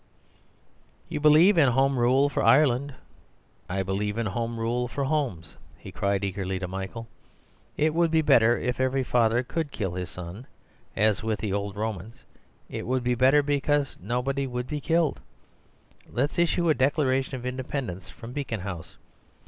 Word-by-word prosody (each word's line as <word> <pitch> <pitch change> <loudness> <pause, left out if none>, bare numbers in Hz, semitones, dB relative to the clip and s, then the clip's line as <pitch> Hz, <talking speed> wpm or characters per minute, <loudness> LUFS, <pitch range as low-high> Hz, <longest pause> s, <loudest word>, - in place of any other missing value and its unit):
"You - - -3
believe 155 +5 +6
in 145 - +6
Home 135 +1 +2
Rule 130 +4 +4
for 145 - -2
Ireland; 140 -1 +3 0.7
I 95 +1 -1
believe 105 +3 -2
in 115 - -1
Home 115 +3 -3
Rule 120 +2 -1
for 140 +3 -3
homes," 130 - -2 0.2
he - - -11
cried 100 0 -1
eagerly 95 -1 -2
to 95 -1 -4
Michael. 95 +5 -6 0.7
"It 155 +1 +2
would 170 0 +2
be 160 0 +2
better 120 -4 +5
if 125 +1 -2
every 130 +1 +1
father 120 -1 +2
COULD 160 +3 -3
kill 95 -8 -3
his 90 -1 -4
son, 90 +8 -9 0.5
as 105 0 +2
with 110 -1 -1
the 100 0 -3
old 100 0 -3
Romans; 110 +3 -5 0.4
it - - -6
would 130 0 0
be 125 0 +1
better, 130 +4 +4
because 145 0 0
nobody 130 +6 -1
would 125 -1 -4
be 150 +2 -4
killed. 165 0 +1 0.9
Let's 140 +7 -1
issue 170 0 +2
a - - +5
Declaration 135 -1 +1
of 125 -1 -7
Independence 125 -7 -4
from 115 +7 -10
Beacon 125 -7 -4
House. 90 -4 -7
125 Hz, 165 wpm, -26 LUFS, 105-140 Hz, 0.9 s, believe